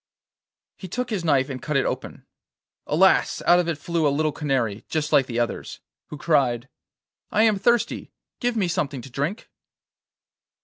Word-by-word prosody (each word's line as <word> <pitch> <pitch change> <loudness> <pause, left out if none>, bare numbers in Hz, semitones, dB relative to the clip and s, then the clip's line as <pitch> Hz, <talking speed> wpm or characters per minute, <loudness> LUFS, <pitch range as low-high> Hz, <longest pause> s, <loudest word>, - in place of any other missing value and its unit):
He 190 - -8
took 250 +6 -4
his 200 -5 -2
knife 140 -5 +2
and 130 -3 -6
cut 150 -3 -1
it 135 - +1
open. - - -5 0.6
Alas! 190 +5 +3
out 175 +1 +6
of 175 - 0
it 165 -3 -1
flew 165 +1 0
a - - +4
little 155 +2 +1
canary, 130 -9 -1
just 155 -1 -1
like 135 -2 +5
the 120 - -4
others, 120 - -3 0.3
who 150 - -8
cried: 135 -6 +1 0.6
'I 215 - +3
am 215 -3 +3
thirsty; 235 +3 +1 0.3
give 245 -2 -1
me 195 -4 +1
something 145 -7 -2
to 135 - -11
drink. 145 - -3
150 Hz, 170 wpm, -24 LUFS, 135-185 Hz, 0.6 s, out